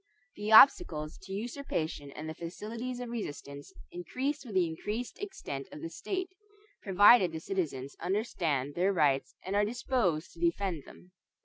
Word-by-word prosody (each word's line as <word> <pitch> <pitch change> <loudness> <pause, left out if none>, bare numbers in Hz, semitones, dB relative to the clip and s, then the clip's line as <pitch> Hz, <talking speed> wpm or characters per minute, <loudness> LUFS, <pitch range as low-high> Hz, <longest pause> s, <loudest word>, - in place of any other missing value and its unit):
The 210 +1 -3
obstacles 220 - +6
to 190 - -11
usurpation 195 - -3
and 155 - -7
the 160 - -4
facilities 225 +10 -6
of 245 -1 -5
resistance 145 -10 -6 0.2
increase 260 - -3
with 225 -7 -9
the 185 -2 +4
increased 210 +9 -4
extent 385 - -6
of 150 - -9
the 165 - -5
state, 370 - -4 0.5
provided 200 -1 +6
the 160 - -5
citizens 150 -7 -3
understand 165 - -1
their 185 +5 +2
rights 140 -6 +2
and 190 +2 -2
are 205 - +4
disposed 210 -7 0
to 170 - -16
defend 170 -2 0
them. 180 - -15
185 Hz, 150 wpm, -31 LUFS, 160-235 Hz, 0.5 s, obstacles